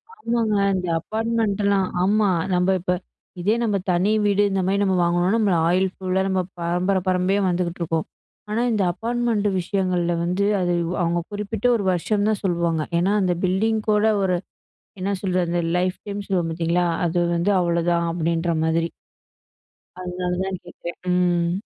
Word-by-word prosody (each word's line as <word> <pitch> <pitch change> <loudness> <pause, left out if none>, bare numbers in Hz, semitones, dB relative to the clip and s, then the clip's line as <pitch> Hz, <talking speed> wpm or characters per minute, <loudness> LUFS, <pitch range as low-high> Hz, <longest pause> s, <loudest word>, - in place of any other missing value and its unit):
ஆமாங்க. 230 - 0 0.2
இந்த 180 -1 -2
அப்பார்ட்மெண்ட்லாம் 210 -1 0 0.2
ஆமா. 205 +1 +3 0.2
நம்ம 180 +1 +2
இப்ப, 180 +1 -1 0.5
இதே 205 +5 +2
நம்ம 210 -3 +1
தனி 180 +4 +2
வீடு 205 0 +3
இந்த 195 0 0
மாரி 200 +1 +1
நம்ம 190 -2 +2
வாங்குனோன்னா, 175 +1 +2
நம்ம 210 -3 +2 0.2
ஆயில் 185 +2 +2
ஃபுல்லா 190 0 -1
நம்ம 190 -1 +1 0.2
பரம்பர 180 +3 0
பரம்பரயா 185 +2 +2
வந்துகிட்டுருக்கோம். 170 -2 -2 0.4
ஆனா, 215 +2 0
இந்த 210 -3 +1
அப்பார்ட்மெண்ட்டு 230 -1 0
விஷயங்கள்ல 180 -2 0
வந்து, 180 +4 0 0.2
அது 175 -1 +1
அது 170 +1 -1
அவங்க 170 0 +1
குறிப்பிட்ட 210 +2 -4
ஒரு 215 - -1
வருஷம் 205 +4 0
தான் 215 -2 -1
சொல்லுவாங்க. 170 -3 0 0.2
ஏனா, 190 +4 +2
அந்த 180 -2 +1
பில்டிங் 215 +4 +1
கூட 210 0 +3 0.2
ஒரு 185 -2 +1 0.6
என்ன 190 +2 -1
சொல்றது? 180 -2 0 0.2
லைஃப் 185 0 -1
டைம் 205 0 -4
சொல்லுவோம் 180 -4 0
பார்த்தீங்களா! 170 +2 0 0.2
அது 170 +1 -1 0.2
வந்து 170 +4 +1
அவ்ளதான், 170 0 +1
அப்படின்ற 170 0 0
மாதிரி. 165 +1 +1 1.1
அதனால 180 0 -3
தான் 190 -1 -4
கேட்கேன். 175 -1 -8 0.2
ம். 175 -1 +2
185 Hz, 150 wpm, -22 LUFS, 175-200 Hz, 1.1 s, ஆமா